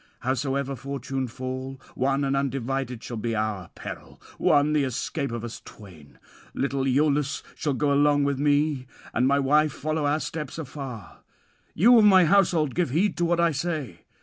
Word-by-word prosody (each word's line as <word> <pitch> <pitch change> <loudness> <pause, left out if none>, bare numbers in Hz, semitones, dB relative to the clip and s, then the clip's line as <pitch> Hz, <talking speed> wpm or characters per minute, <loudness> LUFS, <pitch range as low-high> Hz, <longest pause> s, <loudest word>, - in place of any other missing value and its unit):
Howsoever 135 +1 -1
fortune 135 0 -4
fall, 130 +2 -6
one 135 +2 0
and 135 0 0
undivided 135 -2 -2
shall 120 - -6
be 115 +1 -2
our 105 -5 -2
peril, - - -9 0.2
one 145 +1 +3
the 150 -2 +2
escape 135 +2 -3
of 120 -1 -4
us 120 -1 -7
twain. 85 -9 -14 0.4
Little 135 -1 -1
Iülus 140 +1 +1
shall 145 -4 -2
go 145 +1 +1
along 145 0 +3
with 140 -1 0
me, 145 -2 +1 0.3
and 125 +3 +2
my 140 +1 +3
wife 150 +2 +3
follow 155 0 -2
our 150 +2 +1
steps 150 -3 -5
afar. 135 -7 -8 0.6
You 235 +7 +6
of 215 - +5
my 190 -3 +7
household, 165 -6 +3
give 175 -5 0
heed 175 +10 +1
to 175 - +1
what 170 0 +1
I 170 -1 +3
say. 145 - -3
140 Hz, 170 wpm, -25 LUFS, 130-150 Hz, 0.6 s, my